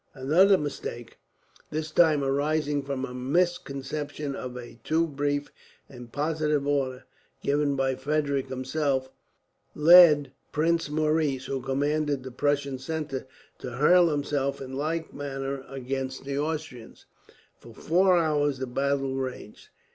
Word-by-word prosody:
Another 170 +9 +4
mistake 120 -6 -6 0.5
this 155 0 -4
time 155 -4 +4
arising 145 +1 0
from 135 -1 -3
a 125 - -9
misconception 145 0 -2
of 125 -1 -6
a 120 -1 -10
too 165 +1 +2
brief 145 -1 -2 0.4
and 125 -3 -12
positive 150 0 0
order, 135 -3 -1 0.4
given 145 0 +1
by 135 -1 +1
Frederick 140 0 -1
himself 130 0 -1 0.6
led 155 -2 +7 0.2
Prince 165 +1 +1
Maurice, 150 -3 0
who 135 -1 -3
commanded 145 +1 -1
the 130 - -7
Prussian 140 0 -1
centre, 135 -2 -4 0.3
to 125 - -7
hurl 170 +6 +5
himself 145 -2 -1
in 135 -1 -8
like 160 +4 -3
manner 135 -1 -4
against 135 0 -4
the 140 0 -3
Austrians. 150 -5 -5 0.5
For 120 - -14
four 180 - +3
hours 145 -4 +1
the 130 - -3
battle 135 +1 -1
raged. 130 -5 -6
140 Hz, 125 wpm, -27 LUFS, 135-155 Hz, 0.6 s, led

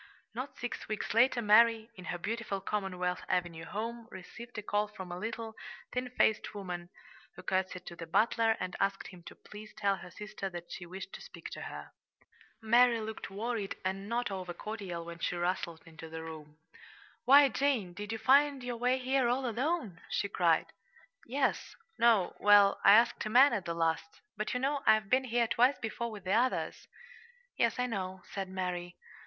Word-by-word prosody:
Not 255 +5 -6
six 245 - -5
weeks 215 -1 -3
later 240 +1 +4
Mary, 225 +1 +5
in 185 - -11
her 175 - -3
beautiful 215 +1 -3
Commonwealth 185 -3 -2
Avenue 170 -2 -1
home, 230 +2 -5
received 235 +5 -10
a 210 - -4
call 205 +1 0
from 190 -4 -9
a 175 - -5
little, 225 +2 -5 0.4
thin 250 0 -2
faced 220 -4 +1
woman, 180 -3 -5 0.5
who - - -11
curtsied 185 -1 -1
to 170 - -8
the 165 -1 -8
butler 225 +4 +2
and 185 -1 -4
asked 195 0 -1
him 180 -2 -13
to - - -10
please 215 +1 -12
tell 200 -2 +1
her 180 - -10
sister 205 0 -6
that 175 -1 -9
she 175 - -7
wished 190 +2 -8
to - - -8
speak - - -10
to - - -7
her. - - -8 0.7
Mary 235 +1 +5
looked 220 0 -6
worried 210 0 -3
and 195 +2 -3
not 235 -2 -1
over 180 -2 -5
cordial 195 -6 -5
when 170 0 -8
she 175 - -1
rustled 175 -1 -2
into 160 -1 -11
the 160 0 -6
room. 155 -2 -10 0.7
"Why, 280 +2 +8
Jane, 245 -8 0
did 205 +3 -6
you 225 - -2
find 275 +3 +4
your 245 -1 -4
way 250 +2 +2
here 260 0 +1
all 250 +2 0
alone?" 240 - -2
she - - 0
cried. 170 -5 +1 0.5
"Yes 265 +3 -1 0.2
no 225 -6 +4
well, 205 -1 +6
I 200 - +9
asked 230 +3 +4
a - - -3
man 255 +4 +7
at 205 -6 -2
the 170 - -3
last; 165 -1 -1
but, 215 +4 -3
you - - +1
know, 275 +2 0
I've 215 -2 +4
been 260 +1 +4
here 240 -1 +2
twice 250 +5 +3
before 235 +1 -4
with 210 -4 -9
the 190 +1 0
others." 250 +4 0 0.7
"Yes, 235 -1 +1
I 250 - +1
know," 190 -5 -4
said 195 -1 -4
Mary. 180 -2 -4
210 Hz, 185 wpm, -32 LUFS, 180-235 Hz, 0.7 s, I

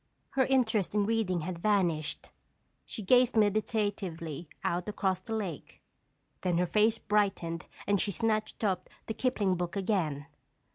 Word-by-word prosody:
Her 265 -2 +2
interest 225 -7 +2
in 205 -1 +3
reading 210 -6 +1
had 175 +1 -4
vanished. 175 -6 0 0.6
She 215 - -6
gazed 250 +4 +4
meditatively 205 - 0
out 175 +3 -1
across 190 -3 0
the 225 +4 -4
lake. 190 -9 -5 0.6
Then 180 -2 +1
her 180 - +3
face 215 +5 +3
brightened 195 -6 0 0.2
and 200 -1 +2
she 205 - 0
snatched 215 +2 -1
up 190 -3 0 0.2
the 220 - -3
Kipling 210 -7 +1
book 175 -1 -3
again. 180 -8 0
200 Hz, 140 wpm, -30 LUFS, 175-220 Hz, 0.6 s, gazed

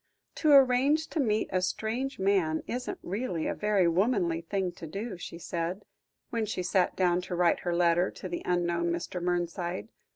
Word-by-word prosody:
"To 310 - +3
arrange 275 +4 +5
to 325 - -3
meet 220 -6 +1
a 185 - +2
strange 230 +8 -2
man 190 -5 +1
isn't 250 +1 -4
really 185 -4 -2
a - - 0
very 205 -4 +2
womanly 175 -2 +1
thing 185 +2 -2
to 170 -1 -9
do," 200 +6 -5
she 170 - -7
said, 175 +3 -4 0.5
when 230 -2 -1
she 185 -3 -2
sat 185 +1 +1
down 180 -1 +2
to 180 0 -5
write 175 -1 +3
her 175 -1 -2
letter 175 +1 +3
to - - -8
the 175 -1 -4
unknown 170 -1 0
Mr. 175 +1 -3
Mernside. 175 +2 -2
180 Hz, 175 wpm, -29 LUFS, 175-220 Hz, 0.5 s, arrange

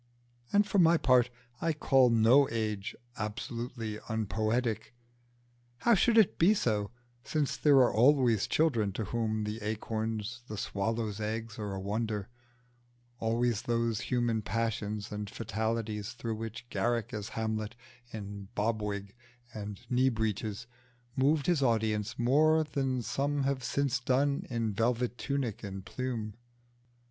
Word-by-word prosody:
And 205 0 +4
for 200 -1 +1
my 170 -1 +6
part 125 -4 +4 0.3
I 165 0 +1
can 155 - -18
call 130 -2 +5
no 115 +5 +5
age 110 -3 -2 0.2
absolutely 115 0 -4
unpoetic: 110 +2 -1 0.9
how 235 - +5
should 230 +3 +4
it 220 -5 +4
be 195 +6 +6
so, 105 - 0 0.3
since 150 0 -1
there 145 -2 +4
are 130 -2 +5
always 120 -3 +4
children 115 -11 +2
to 110 - -2
whom 110 0 -1
the 105 +2 -4
acorns 110 +2 -3
and 105 - -6
the - - -3
swallow's 110 +1 -2
eggs 110 +1 -4
are 100 -2 -3
a - - -4
wonder, 105 +1 -2 0.9
always 115 0 +1
those 115 -2 0
human 120 -3 0
passions 105 -1 -2
and 105 -1 -4
fatalities 110 -1 -3
through 115 -2 -4
which 115 +2 -6
Garrick 120 -2 0
as 105 -1 -4
Hamlet 110 0 -2 0.4
in 100 -2 -7
bob 110 +1 0
wig 100 -1 -4 0.4
and 105 -2 -6
knee 130 +1 +3
breeches 110 -1 -2 0.5
moved 140 +2 +2
his 175 -5 +2
audience 110 -2 +1
more 155 +6 +4
than 135 -4 -1
some 140 +3 0
have 135 -1 -1
since 140 0 0
done 135 +3 +1
in 115 -3 -1
velvet 120 +3 0
tunic 135 -6 -2
and 95 -1 -6
plume? 120 -5 -4
115 Hz, 140 wpm, -31 LUFS, 105-130 Hz, 0.9 s, my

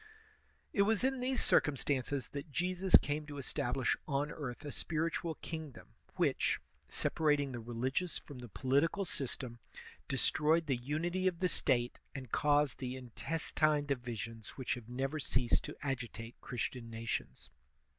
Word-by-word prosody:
It 200 - +4
was 215 +3 +3
in 265 0 +2
these 255 +1 +1
circumstances 140 -2 +2
that 145 +2 -6
Jesus 180 +4 +3
came 150 +1 -2
to 145 - -7
estab 140 -1 -1
lish 130 -3 +2
on 145 +1 0
earth 140 -2 -5
a 145 - -3
spiritual 165 +1 -1
kingdom, 160 -5 -6 0.3
which, - - +2 0.3
separating 150 -3 +2
the 120 - -4
religious 125 +9 -1
from 140 -4 -10
the 120 -1 -8
political 140 - +2
system, 125 -5 -4 0.5
destroyed 155 +4 +3
the 140 -3 +2
unity 165 +9 0
of 180 -2 +1
the 180 - +2
State, 120 -7 +2 0.2
and 130 -4 -6
caused 145 -1 +3
the 130 0 -3
intestine 150 +3 0
divisions 115 -4 -4
whiclx 130 -2 0
have 120 -2 -7
never 135 +5 -1
ceased 130 -4 +2
to - - -6
agitate 120 -4 -4
Christian 120 0 -3
nations. 115 0 -4
140 Hz, 145 wpm, -35 LUFS, 125-160 Hz, 0.5 s, It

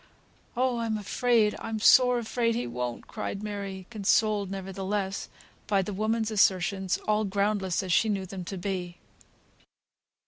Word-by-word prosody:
"Oh! 250 -1 +1
I'm 225 -2 -1
afraid! 220 +1 +2
I'm 225 -1 -4
sore 250 +3 +6
afraid 230 0 0
he 240 - -1
won't," 120 0 -4
cried 200 - -5
Mary, 200 -3 -5
consoled, 210 -1 +2
nevertheless, 195 +1 -3 0.4
by 200 -2 +2
the 205 - -5
woman's 220 +2 0
assertions, 190 -2 +2
all 215 0 +2
groundless 200 -2 0
as 185 -2 -1
she 220 - +3
knew 195 -2 -1
them 190 0 -7
to 195 +2 -5
be. 180 -2 -4
200 Hz, 140 wpm, -28 LUFS, 190-220 Hz, 0.4 s, sore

